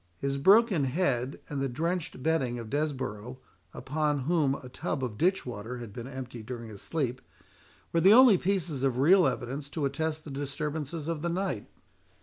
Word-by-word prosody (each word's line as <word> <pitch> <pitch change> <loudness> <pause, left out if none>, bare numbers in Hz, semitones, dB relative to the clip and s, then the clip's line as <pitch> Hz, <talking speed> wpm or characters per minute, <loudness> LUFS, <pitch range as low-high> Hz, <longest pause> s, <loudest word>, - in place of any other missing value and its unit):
His 140 +4 -2
broken 195 - +5
head, 135 -3 -1
and 140 -2 -3
the 135 - 0
drenched 165 +1 -3
bedding 135 -7 +1
of 115 -2 -7
Desborough, 130 -6 -3 0.3
upon 150 0 -1
whom 145 -2 +2
a 125 - -9
tub 130 +2 -3
of 120 -4 -3
ditch 185 - +1
water 120 +1 -6
had 115 -4 -8
been 120 +2 -7
emptied 125 -4 -8
during 120 -2 -6
his 100 -3 -10
sleep, 130 -5 -2 0.7
were 165 - +3
the 190 - +7
only 235 -5 +8
pieces 175 -7 -1
of 135 -2 +1
real 170 +5 +6
evidence 135 +2 -3
to 145 0 -2
attest 155 +3 -2
the 150 - -7
disturbances 145 +2 -4
of 165 -3 -2
the 170 - -1
night. 175 - -2
140 Hz, 175 wpm, -29 LUFS, 125-165 Hz, 0.7 s, only